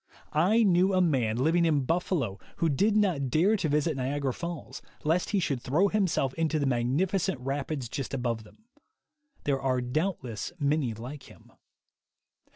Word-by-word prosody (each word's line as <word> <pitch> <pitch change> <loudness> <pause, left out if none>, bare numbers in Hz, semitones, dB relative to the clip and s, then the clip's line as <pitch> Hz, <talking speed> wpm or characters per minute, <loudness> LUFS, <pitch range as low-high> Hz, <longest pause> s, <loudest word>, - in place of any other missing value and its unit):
I 190 +10 +4
knew 190 -1 +3
a - - +4
man 130 -11 +2
living 160 +7 +3
in 155 -4 +3
Buffalo 155 - -1 0.2
who 165 -1 +1
did 205 +9 +2
not 170 -11 +1
dare 175 - +3
to 165 -5 -1
visit 150 +2 +1
Niagara 135 0 -1
Falls, 170 0 -6 0.2
lest 165 +4 +1
he 205 - +1
should 140 -8 -1
throw 165 +12 +2
himself 185 -10 +1
into 160 0 0
the 145 - 0
magnificent 145 +8 0
rapids 135 0 -3
just 135 +2 -5
above 120 -4 -2
them. 215 - -20 0.8
There 135 -2 0
are 130 -1 +1
doubtless 125 - -3
many 140 -5 +1
like 130 +6 -9
him. - - -18
150 Hz, 160 wpm, -28 LUFS, 130-175 Hz, 0.8 s, I